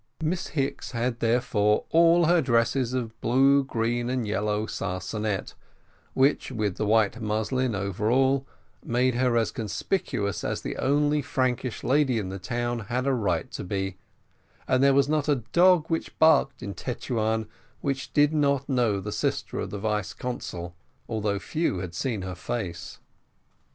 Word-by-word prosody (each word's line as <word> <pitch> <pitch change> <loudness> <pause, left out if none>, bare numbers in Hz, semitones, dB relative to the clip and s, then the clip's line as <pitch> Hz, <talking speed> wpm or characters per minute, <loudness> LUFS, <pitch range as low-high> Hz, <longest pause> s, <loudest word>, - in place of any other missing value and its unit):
Miss 165 +3 -1
Hicks 135 -1 -2
had 120 0 -1
therefore 115 -3 +2
all 170 +1 +5
her 170 +1 +4
dresses 125 0 +1
of 115 -3 -4
blue, 135 +4 +4
green, 120 -1 -1
and 125 -3 -1
yellow 105 0 0
sarcenet, 95 +2 -3 0.6
which, 135 +1 +2
with 105 -6 -2
the 105 - -1
white 110 +1 +2
muslin 110 +3 0
overall, 120 +8 +1 0.4
made 125 +2 +1
her 125 -1 +2
as 115 - +1
conspicuous 110 - -2
as - - -2
the - - -4
only 145 +2 +2
Frankish 130 -2 -1
lady 135 -2 +2
in 100 -4 -2
the 95 +1 -6
town 120 +4 -2
had 125 +2 -1
a 135 - +2
right 100 -9 -1
to - - -5
be, 95 0 -3 0.7
and 130 - +2
there 140 0 +5
was 140 0 +4
not 150 0 0
a 135 -5 +1
dog 180 -2 +5
which 165 -1 -3
barked 160 -4 +4
in 100 - -4
Tetuan 110 -3 -2 0.3
which 135 -3 -3
did 145 +3 +3
not 140 -3 +1
know 120 -7 +1
the 105 +2 -5
sister - - -2
of - - -3
the 105 - -5
vice 105 -1 -2
consul, 85 -8 -5 0.3
although 105 -2 -1
few 155 - -1
had 90 -1 -5
seen 105 +2 -2
her 95 -1 -4
face. 90 -3 -5
120 Hz, 155 wpm, -26 LUFS, 105-135 Hz, 0.7 s, all